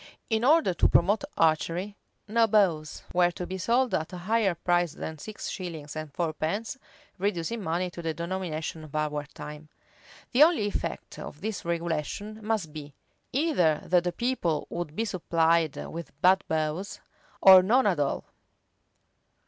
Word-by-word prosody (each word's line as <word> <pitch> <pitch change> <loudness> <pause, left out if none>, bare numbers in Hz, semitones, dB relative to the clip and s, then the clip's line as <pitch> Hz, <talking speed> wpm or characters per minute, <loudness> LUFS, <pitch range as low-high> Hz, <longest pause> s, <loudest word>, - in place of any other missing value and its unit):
[] - - -42
In 220 +1 +1
order 300 - +4
to 170 - +3
promote 205 +8 +3
archery, 170 +5 +1 0.3
no 225 +2 +3
bows 180 -8 +1
were 175 0 +4
to 175 0 -6
be 190 +1 -5
sold 240 +7 +2
at 160 +3 -1
a 180 - -6
higher 195 +1 +1
price 175 -1 +1
than 160 -2 -6
six 215 +6 -7
shillings 160 -6 -6
and 155 -1 -5
fourpence,[] 170 - -2 0.4
reducing 200 +3 -1
money 175 +1 -1
to 175 - -8
the 165 -1 -1
denomination 170 -3 -4
of 155 -1 -11
our 150 -1 -1
time. 150 +1 -9 0.6
The 255 - +3
only 315 -7 +6
effect 205 - -4
of 150 - -9
this 215 -1 -4
regulation 170 +6 -3
must 210 -8 -1
be, 145 -2 -9 0.4
either 250 - +2
that 175 0 +3
the 175 - -1
people 210 - -1
would 170 -3 -4
be 225 - 0
supplied 165 -5 +1
with 160 -4 -7
bad 185 +3 +5
bows, 160 +5 -2 0.4
or 190 -2 +9
none 230 +7 +3
at 185 -7 +2
all. 140 -1 -1
175 Hz, 155 wpm, -27 LUFS, 160-210 Hz, 0.6 s, or